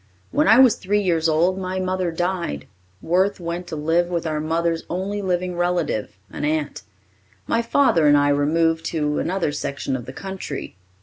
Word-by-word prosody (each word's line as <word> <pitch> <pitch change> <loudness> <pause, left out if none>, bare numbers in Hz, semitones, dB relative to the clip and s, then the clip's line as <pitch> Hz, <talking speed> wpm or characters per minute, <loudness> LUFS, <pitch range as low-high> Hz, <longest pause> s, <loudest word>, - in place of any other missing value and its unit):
When - - +2
I 220 +3 +7
was 255 -4 +6
three 205 +2 0
years 165 -3 +1
old, 175 +4 +2
my 185 0 -3
mother 185 -1 -1
died. 170 - -2 0.4
Worth 190 +4 +1
went 170 +1 -5
to - - -5
live 165 +3 +1
with 170 -2 -2
our 155 -1 -1
mother's 165 +1 0
only 195 +4 -3
living 180 -1 -1
relative, 175 - -1
an - - -6
aunt. 150 0 -1 0.6
My 230 - +1
father 230 - +3
and 145 0 +6
I 145 0 +3
removed 160 +3 +2
to 150 -2 -1
another 180 -4 -1
section 140 -2 -3
of 120 -3 -5
the 130 - -7
country. 190 -4 -6
170 Hz, 175 wpm, -22 LUFS, 155-185 Hz, 0.6 s, I